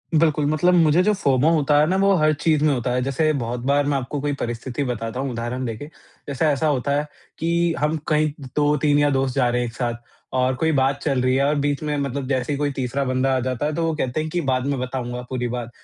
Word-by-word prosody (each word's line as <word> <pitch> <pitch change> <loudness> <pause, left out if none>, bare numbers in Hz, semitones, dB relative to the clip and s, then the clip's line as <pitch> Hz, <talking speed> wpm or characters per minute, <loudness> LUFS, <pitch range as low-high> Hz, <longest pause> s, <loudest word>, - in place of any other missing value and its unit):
बिल्कुल, 155 -2 +3
मतलब 155 +5 +2
मुझे 165 0 +4
जो 210 +1 +3
फोमो 140 -5 +2
होता 150 -2 +3
है 150 - +4
ना 190 - +1
वो 195 0 +4
हर 155 0 +3
चीज़ 150 0 +1
में 150 -2 +3
होता 125 0 -1
है। 125 0 0
जैसे 155 +4 +1
बहुत 120 +1 -3
बार 140 +1 +2
मैं 145 -1 +1
आपको 135 +3 -4
कोई 145 0 -1
परिस्थिति 120 +4 -3
बताता 120 -1 -4
हूँ 135 -1 -2
उदाहरण 120 +2 -3
देके। 115 +4 -5 0.4
जैसे 140 +3 -1
ऐसा 150 +1 +2
होता 140 -1 0
है 150 - -3 0.3
कि 170 0 +1
हम 150 +2 0
कहीं 155 0 +2 0.2
2-3 145 0 +2
या 145 0 +3
दोस्त 135 -1 0
जा 125 -3 +3
रहे 125 0 0
हैं 120 - -1
एक 115 - -9
साथ 120 -2 -2 0.4
और 130 0 +2
कोई 160 +4 +1
बात 135 0 +1
चल 135 -4 +1
रही 130 0 +2
है 135 - +2
और 150 +1 +2
बीच 145 +1 -1
में 150 -1 -1
मतलब 140 -1 -3
जैसे 130 +1 -1
ही - - -2
कोई 145 -1 0
तीसरा 135 +1 -2
बंदा 130 +1 +1
आ - - +1
जाता 130 +2 -2
है 150 - -1
तो 170 - -1
वो 160 - 0
कहते 130 0 -2
हैं 155 - -4
कि 175 +2 -1
बाद 130 0 0
में 140 -2 -1
बताऊँगा 125 -1 -4
पूरी 125 -2 -2
बात 120 -1 -4
140 Hz, 260 wpm, -22 LUFS, 125-150 Hz, 0.4 s, मुझे